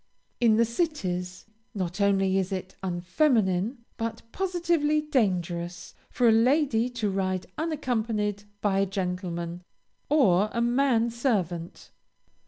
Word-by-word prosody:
In 225 -3 +4
the 230 - +4
cities, 190 - -2 0.3
not 185 0 -3
only 195 -1 +3
is 190 0 -2
it 185 0 -5
unfeminine, 190 - +1
but 225 0 -4
positively 340 -5 +1
dangerous, 180 - -1 0.2
for 245 - +2
a - - +7
lady 245 0 +3
to 235 -5 -2
ride 185 -1 -1
unaccompanied 225 -10 -1 0.2
by 195 -2 +2
a 195 - +2
gentleman, 180 -2 -3 0.5
or 215 - +4
a 235 - 0
man 240 -1 +2
servant. 185 - -2
210 Hz, 115 wpm, -27 LUFS, 185-250 Hz, 0.5 s, a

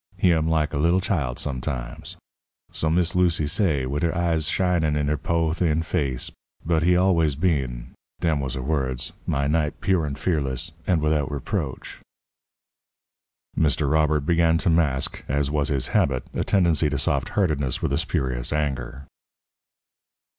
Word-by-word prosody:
He 90 - +4
am 80 -1 +1
like 80 -2 +1
a 70 - -1
little 85 +4 +3
child 75 -10 -1
sometimes' 65 -3 -4 0.5
so 80 - -1
Miss 85 +1 +1
Lucy 90 -4 +2
say, 75 -4 +1
wid 70 +3 -2
her 85 0 0
eyes 85 -3 +1
shinin' 85 -5 +1
in 75 -1 0
her 75 - +1
po', 80 +2 0
thin 80 -2 +1
face 70 -7 -2 0.3
'but 80 -1 +2
he 90 +2 +4
always 85 -6 +3
been' 65 -7 -1 0.3
dem 80 -4 +1
was 65 -3 -3
her 65 - -4
words 65 -4 -1
'my 70 0 0
knight, 75 0 0
pure 90 -5 +1
and 70 -1 -5
fearless 75 -2 -1 0.2
and 85 -4 +2
widout 75 -2 +1
reproach.'" 70 -3 -4 1.6
Mr. 75 -2 +1
Robert 75 -1 +2
began 80 +2 +3
to 85 - +1
mask, 75 -5 0
as 70 +1 0
was 75 -1 +1
his 70 -3 -1
habit, 65 -2 +1
a - - -1
tendency 85 -5 +2
to 70 - -2
soft - - 0
heartedness 75 -9 0
with - - 0
a - - +2
spurious 65 -8 -1
anger. 70 -3 -3
75 Hz, 160 wpm, -24 LUFS, 70-85 Hz, 1.6 s, He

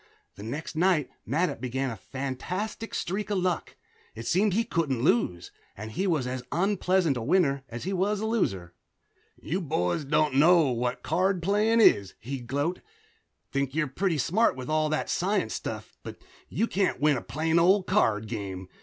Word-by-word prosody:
The - - -12
next 140 +10 -5
night 170 -3 +2 0.2
Mattup 165 +9 0
began 130 +1 -2
a - - -5
fantastic 145 - -5
streak 200 +3 -2
of 205 - 0
luck. 180 -2 -1 0.4
It 115 +1 -7
seemed 195 - +2
he 230 - +3
couldn't 145 - -1
lose, 90 -9 +1 0.3
and 105 +2 -7
he 190 - -1
was 155 -8 +1
as 125 0 -3
unpleasant 180 -3 +1
a - - -3
winner 140 0 +2
as 120 0 -6
he 190 - -2
was 195 +3 0
a 220 - -2
loser. 95 - -1 0.7
"You 180 +5 -2
boys 90 - -1
don't 150 0 +1
know 155 0 +5
what 120 0 -2
card 185 +2 +1
playin' 210 +4 +3
is," 100 - +4
he'd 125 0 -6
gloat. 145 +7 -1 0.7
"Think 140 0 -1
you're 155 -1 +2
pretty 165 +5 -1
smarty 180 - +2
with 130 +1 -6
all 155 0 +2
that 155 - -1
science 195 +4 0
stuff - - -6
but - - -8 0.3
you 225 - 0
can't 200 -4 0
win 150 0 +3
a 125 - -3
plain 160 +2 0
old 185 +3 +4
card 110 - +2
game. 95 -4 -5
155 Hz, 175 wpm, -27 LUFS, 125-185 Hz, 0.7 s, know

